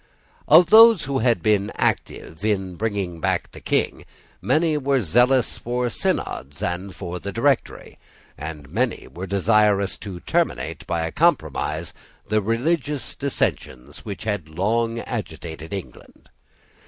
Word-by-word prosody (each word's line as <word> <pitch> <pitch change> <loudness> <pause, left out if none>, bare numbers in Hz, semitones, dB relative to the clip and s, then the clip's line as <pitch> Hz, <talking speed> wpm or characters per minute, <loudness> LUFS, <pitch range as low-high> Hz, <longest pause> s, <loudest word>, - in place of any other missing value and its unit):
Of 165 +4 +7
those 225 -4 +8
who 135 -1 -1
had 115 -7 +1
been 105 -1 +2
active 80 +5 -2
in 95 -4 -1
bringing 100 -4 -3
back - - -1
the - - -12
King, - - -1 0.4
many 160 0 +2
were 140 -2 +1
zealous 125 +7 +2
for 120 0 -2
Synods 70 -7 -3
and 90 +1 -3
for 90 0 -5
the 100 - -5
Directory, 135 +5 -1 0.4
and 75 0 -7
many 115 - -2
were 90 +3 -7
desirous 100 +1 +2
to 95 -4 -7
terminate 80 +8 -1
by 85 -1 -1
a 80 - -4
compromise 80 +1 0 0.3
the 105 +1 +1
religious 140 - -1
dissensions 65 - -3
which 100 -2 -6
had 105 -7 -3
long 115 +8 0
agitated 80 - -6
England. 95 -2 -9
100 Hz, 130 wpm, -23 LUFS, 85-125 Hz, 0.4 s, those